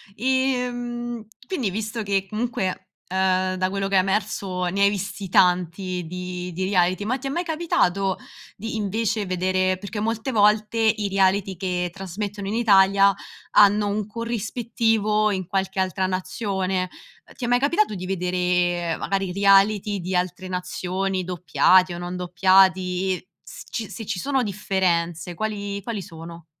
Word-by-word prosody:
Ehm, 245 -2 -1 0.2
quindi 265 - -1
visto 215 +3 -3
che 195 -1 0
comunque, 210 -4 -3 0.2
ehm, 185 0 +1
da 185 0 0
quello 195 0 -2
che 195 - -1
è - - +7
emerso 190 -1 -1
ne 195 +3 -1
hai 200 - +6
visti 195 -1 -4
tanti 180 0 +2
di 180 +1 -5
di 185 +2 -2
reality, 185 0 +1
ma 255 +5 0
ti 270 - -6
è - - -2
mai 345 +6 -1
capitato 195 - +1 0.4
di 225 +3 -5
invece 215 0 -1
vedere 185 0 0
perché 205 +2 -5
molte 225 +4 -2
volte 210 +1 +3
i 215 -2 +2
reality 195 0 +1
che 180 -1 -2
trasmettono 195 +1 -5
in 205 - -2
Italia 200 -3 +5 0.4
hanno 205 0 +5
un 205 +1 -1
corrispettivo 225 -1 0
in 185 -2 -2
qualche 190 0 -1
altra 185 0 0
nazione, 190 0 -2 0.4
ehm, - - -18
ti 245 - -3
è - - -2
mai 245 +1 +3
capitato 295 - +1
di 185 - -5
vedere, 180 -2 0
magari 195 -1 -1
i - - -5
reality 200 +1 +4
di 185 +2 -4
altre 180 +1 -2
nazioni 185 +1 -2
doppiati 180 +1 +3
o - - -6
non 175 +1 -5
doppiati, 185 0 +2 0.2
s - - -9
ci 220 -3 -4
se 225 - -7
ci 200 -3 -3
sono 270 +3 0
differenze 180 -4 -1
quali 200 +1 -3
quali 210 -1 -4
sono? 165 -2 -10
195 Hz, 155 wpm, -23 LUFS, 185-215 Hz, 0.4 s, è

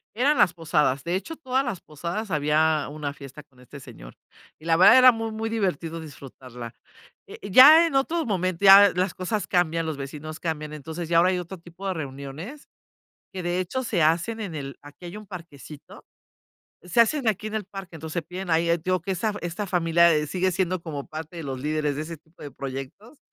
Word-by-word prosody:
Eran 280 +6 +2
las 175 - +4
posadas, 150 -5 0
de 170 - -2
hecho, 200 - -4
todas 265 -2 -1
las 225 -9 -4
posadas 175 +8 -6
había 155 0 +1
una 145 -1 -5
fiesta 140 +1 -12
con 135 -3 -25
este 125 +3 -12
señor - - -13 0.4
y, 155 - -18
la 165 0 +2
verdad, 190 +8 +8
era 255 -1 +8
muy, 225 -1 -4
muy 220 +1 -4
divertido 170 -7 -2
disfrutarla, 130 -5 -11 0.5
eh, - - -10
ya 300 - +9
en 325 - -4
otro 320 +5 +1
momento, 185 -3 -2
ya 200 +1 +9
las 180 +1 -1
cosas 200 +3 -3
cambian, 165 -2 0
los 155 - -3
vecinos 150 +3 -8
cambian, 155 -2 -4
entonces, 160 +3 -7
ya 165 0 +3
ahora 180 +2 +4
hay 185 - -1
otro 180 +2 -7
tipo 175 +3 -11
de 190 - -1
reuniones 145 - -8 0.7
que, 185 -2 -5
de 175 +1 -1
hecho, 185 +9 -3
se 210 -8 -1
hacen 170 +9 +1
en 180 -7 -6
el 140 -2 -7
aquí 145 +4 -14
hay 180 +5 -8
un 215 - -12
parquecito, 155 -5 -12 0.8
se 180 +6 +1
hacen 245 +2 +2
aquí 210 0 -1
en 215 - -6
el 215 - -2
parque. 195 -2 -10
Entonces, 160 0 -8
se 170 - -1
piden 180 +1 -7
ahí 165 +1 +2
eh, 170 - +3
te 160 - -22
digo 185 -1 +1
que 190 +4 -3
esta 215 +4 -1
fa 205 - -7
esta 175 +4 -4
familia, 170 -1 +3
eh, 150 0 0
sigue 185 +4 0
siendo 185 0 -1
como 145 -5 -6
parte 160 +2 -8
de 165 - -6
los 135 -2 -5
líderes 150 0 -1
de 150 - -3
ese 165 +1 -7
tipo 160 +1 -20
de 145 - -7
proyectos, 135 - -8
170 Hz, 215 wpm, -24 LUFS, 150-195 Hz, 0.8 s, ya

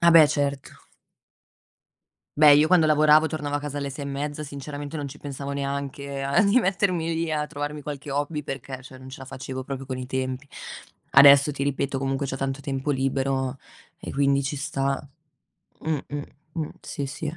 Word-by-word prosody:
Ah 170 0 +6
beh, 160 -2 +9
certo. 140 -2 -2 1.6
Beh, 150 -1 +8
io 150 +2 +5
quando 170 -2 +5
lavoravo 155 +1 +6
tornavo 145 -2 -2
a - - -3
casa 145 -1 -5
alle 140 -1 -2
6 140 +1 -6
e - - -4
mezza, 145 +2 -3
sinceramente 145 +1 -6
non 145 -1 -3
ci 145 +2 -9
pensavo 140 0 -6
neanche 140 0 -3
a 140 +9 +3
di 200 +4 +5
mettermi 180 -4 +1
lì 165 0 -1
a 150 -1 0
trovarmi 145 0 -5
qualche 145 -1 -6
hobby 145 +2 -1
perché, 130 -1 -6
cioè 130 0 -12
non 130 0 -11
ce 135 - -9
la 135 - -9
facevo 130 0 -6
proprio 135 0 -5
con 130 -1 -5
i 125 - -5
tempi. 130 +1 -3 0.6
Adesso, 140 +1 +8
ti 140 - -4
ripeto, 140 -1 -1
comunque 135 +1 -1
c'ho 135 - -3
tanto 135 +1 -2
tempo 135 0 -2
libero 135 -1 0 0.4
e - - -6
quindi 140 0 +2
ci 140 +2 -2
sta. 135 0 -2 0.7
Mh, 155 -2 -1
mh, 145 0 -4 0.3
mh. 160 -3 -3
Sì, 140 - -4
sì. 150 +3 -5
140 Hz, 185 wpm, -25 LUFS, 135-150 Hz, 1.6 s, beh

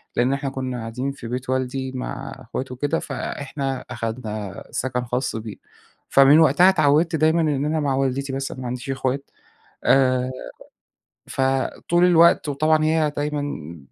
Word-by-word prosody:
لأن 125 +3 +2
إحنا 140 0 -2
كُنا 130 -2 -4
قاعدين 125 +4 -3
في 120 -4 -9
بيت 125 +2 -4
والدي 130 0 -1
مع 130 +1 -5
أخواته 130 +3 -5
وكده، 145 +5 -1
فإحنا 135 -2 -4
أخدنا 110 -4 -5
سكن 125 -1 -2
خاص 125 +1 -2
بينا، 110 -2 -7 0.5
فمن 140 +3 +7
وقتها 160 +4 +6
أتعودت 160 -1 +3
دايمًا 160 +2 +3
إن 145 -3 0
أنا 155 +1 0
مع 140 -3 0
والدتي 135 0 -1
بس، 135 0 -3
أنا 130 - -8
ما 125 - -4
عنديش 125 +2 -5
أخوات 135 +1 -2 0.5
آآ، 130 -1 +3 1.0
فطول 135 +6 +1
الوقت 170 -3 +5
وطبعًا 155 +2 +2
هي 155 -1 +2
دايمًا 145 - -3
135 Hz, 145 wpm, -22 LUFS, 125-150 Hz, 1.0 s, فمن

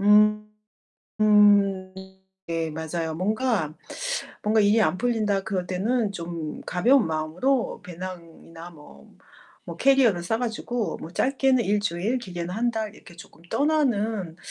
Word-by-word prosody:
음. 210 +1 +5 2.0
네. 165 -1 -2
맞아요. 160 +1 -4
뭔가 210 - -1 0.7
뭔가 215 +1 +3
일이 210 +2 +4
안 185 0 +1
풀린다 215 -5 0
그럴 185 -4 -2
때는 205 +4 0
좀 170 -3 -6
가벼운 235 +7 +3
마음으로 165 - -1
배낭이나 170 -1 -9
뭐 150 -3 -16 0.6
뭐 - - -5
캐리어를 260 -10 +3
싸 220 +6 -1
가지고 240 -1 -3
뭐 160 - -9
짧게는 260 +3 +2
일주일, 205 +3 0
길게는 175 -6 -6
1 240 +2 +1
달 220 -2 -4
이렇게 175 - -16
쪼끔 170 -1 -15
떠나는 225 - 0
205 Hz, 250 characters per minute, -25 LUFS, 170-230 Hz, 2.0 s, 음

